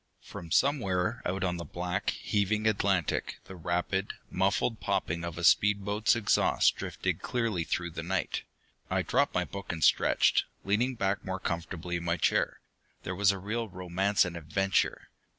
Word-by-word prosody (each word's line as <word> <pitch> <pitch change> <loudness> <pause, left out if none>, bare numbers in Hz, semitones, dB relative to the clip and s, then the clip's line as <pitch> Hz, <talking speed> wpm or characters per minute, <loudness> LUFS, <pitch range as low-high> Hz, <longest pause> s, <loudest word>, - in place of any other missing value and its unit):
_] - - -23
From 85 - -9
somewhere 95 - +1
out 95 +2 -2
on 90 -1 0
the 85 - -5
black, 90 +3 -2
heaving 105 +1 0
Atlantic, 100 -5 +1
the 95 - -10
rapid, 90 +3 -1 0.2
muffled 100 +4 +1
popping 85 +1 -1
of 85 -1 -5
a 85 - -5
speed 100 +3 +4
boat's 105 +3 +2
exhaust 110 -3 +3
drifted - - -3
clearly 115 -8 -1
through 85 +1 -2
the 80 - -5
night. 90 0 -2 0.5
I - - +1
dropped - - +1
my - - +1
book 100 -1 -6
and 80 -2 -4
stretched, - - +4 0.2
leaning 115 +6 +1
back 100 -2 -1
more 95 0 -3
comfortably 85 0 -3
in 85 - -6
my 85 0 0
chair. - - +1 0.4
There 95 - -3
was 100 +1 +4
real 105 +4 -3
romance 95 +2 +1
and 90 -1 -5
adventure! 95 +4 0
95 Hz, 165 wpm, -29 LUFS, 85-100 Hz, 0.5 s, speed